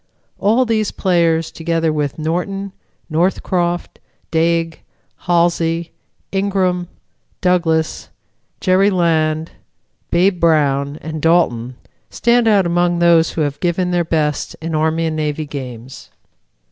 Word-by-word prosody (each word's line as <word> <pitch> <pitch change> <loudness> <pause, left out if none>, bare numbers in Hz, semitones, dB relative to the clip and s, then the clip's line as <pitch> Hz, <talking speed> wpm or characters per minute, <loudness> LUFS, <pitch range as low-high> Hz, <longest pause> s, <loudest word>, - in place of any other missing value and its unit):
All 225 +6 +3
these 220 -2 0
players, 165 -3 +1
together 165 -1 -1
with 145 -2 -2
Norton, 180 +5 -3 0.4
Northcroft, 175 +1 -1 0.3
Dague, 165 0 +1 0.5
Halsey, 170 -1 +1 0.4
Ingram, 190 -2 0 0.5
Douglas, 165 -3 0 0.5
Jerry 190 +1 +3
Land, 160 -3 +1 0.6
Babe 180 +1 +2
Brown 145 -3 +2
and 155 -1 -5
Dalton 130 -8 +1 0.3
stand 235 0 +2
out 205 -4 +4
among 175 0 +1
those 170 -1 +4
who 160 - -2
have 145 -1 -2
given 180 +1 0
their 175 -1 +1
best 155 -3 -1
in 165 +1 -5
Army 160 +1 +1
and 160 -1 -2
Navy 155 0 -2
games. 130 -3 -8
165 Hz, 110 wpm, -18 LUFS, 155-180 Hz, 0.6 s, out